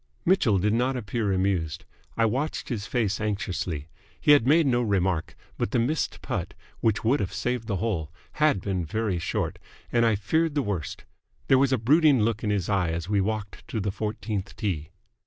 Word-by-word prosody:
'" - - -39
Mitchell 145 - +4
did 105 +3 +1
not 125 +3 +1
appear 110 -2 -1
amused. 95 -5 0 0.3
I 115 - +4
watched 135 +8 -2
his 110 -4 -3
face 110 -6 0
anxiously. 90 -7 -2 0.3
He - - +4
had 145 -5 +6
made 160 +3 +5
no 125 -3 +2
remark, 95 -6 0 0.2
but - - 0
the 125 - 0
missed 130 +7 -1
putt - - -3 0.2
which 110 -2 +1
would 125 +6 +3
have 95 - -2
saved 115 +4 -2
the 100 - 0
hole 90 -6 -2 0.3
had 150 -11 +4
been 95 -2 -1
very 100 +2 -1
short, 85 - -2 0.3
and 120 -1 +3
I 115 -2 +4
feared 160 +10 0
the 145 - +2
worst. 100 -8 -4 0.4
There 135 - +6
was 135 0 +3
a 130 - +3
brooding 145 +4 +4
look 105 0 0
in 105 - 0
his 100 -4 0
eye 95 -4 +1
as 85 +2 -3
we 100 -2 +2
walked 105 0 -4
to 110 - -3
the 100 -1 -1
fourteenth 105 -1 -4
tee. 85 -8 -2
105 Hz, 195 wpm, -26 LUFS, 95-125 Hz, 0.4 s, had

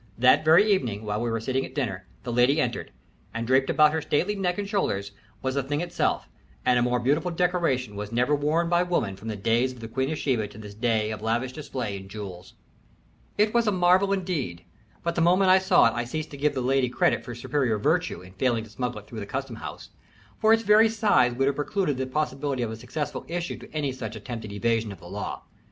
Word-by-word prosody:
That 130 +5 +5
very 160 +6 +6
evening, 120 - 0
while 105 +1 -2
we 120 - -1
were 115 0 -1
sitting 130 +4 -1
at - - -9
dinner, 95 -10 -3 0.2
the 120 -2 -4
lady 125 +5 +4
entered, 120 -5 -2 0.4
and 115 0 -2
draped 130 +2 +3
about 150 0 +5
her 160 - 0
stately 175 +8 0
neck 180 -3 -1
and 205 -1 -3
shoulders 100 - -1 0.3
was 130 0 0
the 140 - +1
thing 145 +3 -2
itself, 175 +1 -1 0.4
and 125 -1 +4
a - - +2
more 125 0 +1
beautiful 145 +8 +1
decoration 170 - 0
was 105 +1 -5
never 125 +5 +2
worn 150 +4 +1
by 175 +1 +3
woman 170 - 0
from 110 - -11
the 110 - -2
days 115 +5 +1
of 125 - -12
the 115 - -7
Queen 130 +4 -1
of 155 - -2
Sheba 120 -8 0
to 105 - -14
this 105 -2 -9
day 110 -1 0
of 110 - -5
lavish 120 +4 -1
display 125 -9 -4
in 95 0 -11
jewels. 95 -3 -8 0.8
It 210 +1 +3
was 235 -1 +3
a - - +4
marvel, 185 +1 +3
indeed, 160 - -2 0.4
but 170 - 0
the 170 - 0
moment 185 +3 +5
I 190 - +7
saw 190 0 +5
it 115 - +3
I 120 - -1
ceased 155 +6 -5
to 140 - -8
give 145 +1 +1
the 130 - -1
lady 130 0 +2
credit - - +1
for 120 - -7
superior 120 -2 0
virtue 160 - 0
in 90 0 -14
failing 115 +2 0
to 110 - -13
smuggle 125 -1 -3
it 105 - -23
through 115 - -7
the 100 - -6
custom 135 -2 -4
house, - - -8 0.5
for 220 - +4
its 225 0 +4
very 215 +2 +6
size 205 - +3
would 135 +2 +1
have 140 - +1
precluded 150 -1 -1
the 130 0 -2
possibility 140 -2 -1
of 115 - -3
a - - -5
successful 125 +6 -4
issue 175 +1 -3
to - - -13
any 150 -3 -1
such 115 -4 -6
attempted 110 -1 -6
evasion 115 +1 0
of 95 - -10
the - - -14
law. - - -5
130 Hz, 235 wpm, -26 LUFS, 115-165 Hz, 0.8 s, I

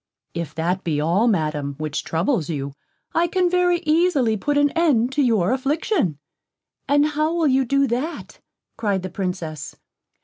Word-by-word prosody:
"If 170 -3 -5
that 180 +4 -1
be 155 -3 -1
all, 175 +10 +2
Madam, 150 -8 0
which 155 -1 -3
troubles 170 - 0
you, 140 -3 -3 0.4
I 340 +1 +2
can 360 0 +1
very 355 -1 +2
easily 305 -8 +3
put 285 +8 -1
an 290 0 +3
end 275 -8 +2
to 285 - +1
your 225 -7 +2
affliction." 275 - 0 0.7
"And 290 +1 +4
how 305 +2 0
will 330 -2 +2
you 265 0 +3
do 275 +3 +2
that?" 265 +7 -4 0.4
cried 200 -4 0
the 185 - -5
Princess. 180 -6 -4
235 Hz, 160 wpm, -22 LUFS, -, 0.7 s, And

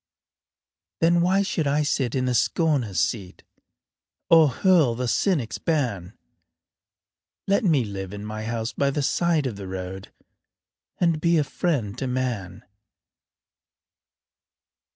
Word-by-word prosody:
Then 170 +1 +3
why 190 +3 +3
should 165 -6 -1
I 145 +2 +2
sit 135 -4 -1
in 130 -1 0
the 125 - 0
scorner's 125 - +1
seat, 95 +2 -2 0.9
Or 160 -3 +7
hurl 155 -3 +3
the 125 +1 -2
cynic's 140 - 0
ban? 115 - -2 1.3
Let 200 +4 +1
me 155 - +2
live 95 -2 -6
in 105 0 -7
my 110 0 -5
house 115 0 -3
by 140 - +1
the 140 +1 -2
side 165 0 +1
of 115 -6 -3
the 100 -2 -7
road 95 +1 -7 0.9
And 165 -3 +1
be 170 0 +3
a 150 - +3
friend 140 - -2
to 135 - -2
man. 120 -8 -3
130 Hz, 130 wpm, -24 LUFS, 105-160 Hz, 1.3 s, Or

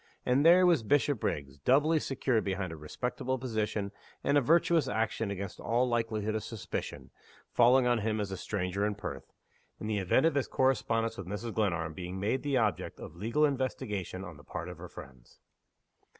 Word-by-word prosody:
And 130 +3 +3
there 175 +3 +7
was 170 -7 +4
Bishopriggs, 105 - 0
doubly 145 - +4
secured 130 -5 0
behind 95 -2 -2
a - - -6
respectable 125 +11 -3
position 110 -5 -2 0.3
and 140 - +2
a 145 - +6
virtuous 165 +3 +3
action 110 0 -1
against 100 -1 -5
all 120 +2 +1
likelihood 115 -3 -1
of 110 - -2
suspicion 115 -3 -6 0.4
falling 125 +2 +5
on 120 -1 +3
him 110 0 -1
as 100 -2 -2
a - - -2
stranger 95 0 -2
in 105 0 0
Perth - - -7 0.5
in - - -6
the 105 -1 0
event 95 - +3
of 165 - +4
his 140 -1 0
correspondence 115 -4 +1
with 95 - -6
Mrs. 105 +4 -4
Glenarm 85 -7 0
being 90 +2 -6
made 110 +7 0
the 140 -2 0
object 105 -9 -1
of - - -9
legal 115 - +2
investigation 125 -9 -2
on 85 -6 -9
the 75 - -15
part - - -6
of - - -9
her - - -8
friends! 65 -3 -13
110 Hz, 180 wpm, -31 LUFS, 100-130 Hz, 0.5 s, there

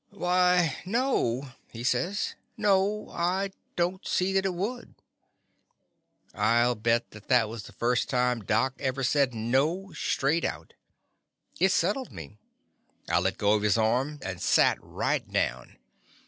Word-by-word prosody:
"Why, 180 -4 +2
no," 180 - 0 0.2
he 115 0 -7
says, 180 +10 0 0.2
"no! 205 0 +1
I 185 +3 -1 0.2
don't 180 +2 -1
see 185 +1 +1
that 195 0 +2
it 185 - -3
would." 230 +7 -4 1.4
I 115 +3 +3
'11 120 -2 0
bet 115 +1 +1
that 105 0 -14
thkt 125 -4 +4
was 115 -1 -6
the - - -12
first 120 +1 0
time 125 -3 +1
Doc 110 +6 +1
ever 135 0 -2
said 135 -1 +2
"No" 145 - 0
straight 145 +5 0
out. - - -4 0.9
It 190 +2 +4
settled 205 +9 0
me. 85 +5 -10 0.7
I - - +3
let - - -1
go 105 +1 +3
of 105 - +2
his 105 0 +2
arm 125 +7 +1
and 90 -2 -5
sat - - +3
right - - -2
down. - - -2
135 Hz, 145 wpm, -27 LUFS, 115-185 Hz, 1.4 s, thkt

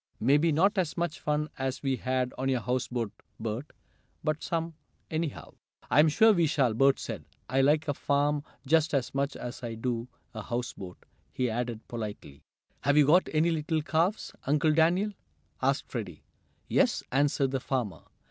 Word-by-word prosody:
"Maybe 145 +7 +4
not 190 +7 +3
as 170 -5 -1
much 170 -2 -2
fun 150 0 0
as 130 +1 -2
we 135 -2 +1
had 130 0 -1
on 130 +1 -1
your 130 -2 +1
houseboat, 120 -1 -2 0.3
Bert, 115 +5 -3 0.6
but 155 0 -1
some, 165 0 -2 0.4
anyhow." 160 -2 -3 0.4
"I'm 150 +4 +6
sure 220 +8 +6
we 170 -4 +3
shall," 135 -6 +2
Bert 135 +4 +4
said. 105 -9 -6 0.2
"I 135 +1 +2
like 150 +3 +3
a 145 - +1
farm 145 +1 +1 0.2
just 155 +1 +3
as 130 -3 -1
much 140 +1 -1
as 120 +1 -6
I 115 -2 -4
do 115 +1 -2 0.3
a 110 - -5
houseboat," 120 -5 -5 0.3
he 125 -2 -1
added 115 -1 -3
politely. 105 - -6 0.4
"Have 145 +1 +2
you 150 - +7
got 175 +6 +4
any 160 +2 +3
little 155 0 -1
calves, 170 +7 0
Uncle 150 +2 +3
Daniel?" 175 +6 +3 0.5
asked - - +1
Freddie. - - -6 0.4
"Yes," - - +2
answered 140 0 +2
the 135 - 0
farmer. 125 -9 -2
140 Hz, 165 wpm, -29 LUFS, 125-155 Hz, 0.6 s, you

